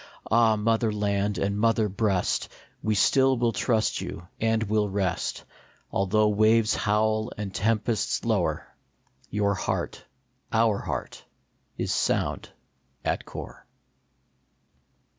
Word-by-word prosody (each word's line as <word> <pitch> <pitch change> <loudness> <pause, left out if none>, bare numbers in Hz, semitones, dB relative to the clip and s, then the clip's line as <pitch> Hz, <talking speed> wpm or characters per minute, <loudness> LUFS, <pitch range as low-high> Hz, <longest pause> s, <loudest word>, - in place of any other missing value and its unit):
Ah, 115 -1 +5
mother 110 +1 +1
land 100 -1 0
and 100 +1 -1
mother 115 -1 +3
breast, 100 -2 0 0.3
We 110 -1 0
still 130 +5 +4
will 120 -1 +2
trust 110 +1 0
you 85 - -7
and 110 0 +1
will 105 -1 +1
rest; 95 -2 -2 0.5
Although 105 +2 +2
waves 110 +1 +3
howl 110 +2 +1
and 100 -2 -5
tempests 110 +3 0
lower, - - 0 0.6
Your 100 0 +1
heart, 95 - -3 0.5
our 110 -2 +3
heart, - - -5 0.5
is - - -1
sound - - 0 0.6
at - - -1
core. - - -9
110 Hz, 110 wpm, -26 LUFS, 100-115 Hz, 0.6 s, Ah